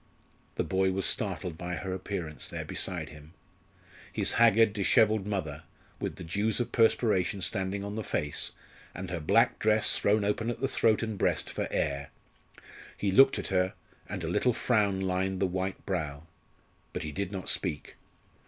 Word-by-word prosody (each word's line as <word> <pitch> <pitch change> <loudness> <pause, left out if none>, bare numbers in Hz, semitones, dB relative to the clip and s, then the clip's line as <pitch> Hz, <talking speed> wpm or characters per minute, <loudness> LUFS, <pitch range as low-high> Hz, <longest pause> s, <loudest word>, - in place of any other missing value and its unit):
The - - 0
boy 95 0 +1
was 95 0 -1
startled 85 -3 -1
by 90 0 -3
her 95 0 -4
appearance 90 -4 -5
there - - -5
beside 85 -4 -2
him 75 +1 -14 0.8
his - - +2
haggard, 115 -2 +6
dishevelled 105 +1 +3
mother, 80 -8 -3 0.4
with - - -3
the - - -8
dews 105 +7 0
of 120 -1 -2
perspiration 105 -4 +2
standing 95 +1 -1
on 100 0 -5
the 110 - -3
face, 75 -6 -2 0.4
and 90 -1 -6
her 90 - -2
black 75 - +3
dress 110 0 +4
thrown 105 0 +2
open 110 +3 0
at 120 - -3
the 135 - 0
throat 110 -4 +2
and 110 -3 -4
breast - - +1
for - - -2
air. 70 0 -1 0.9
He 100 - 0
looked 135 +7 +6
at - - -3
her, 95 0 +1 0.3
and - - -4
a - - -2
little 125 - +2
frown 105 -5 +1
lined 95 0 -1
the 95 - +2
white 95 +1 -3
brow. 75 -6 -3 0.7
But - - -3
he 75 - -4
did 100 +4 -3
not 95 -2 -5
speak. 80 -6 -1
95 Hz, 170 wpm, -29 LUFS, 90-105 Hz, 0.9 s, haggard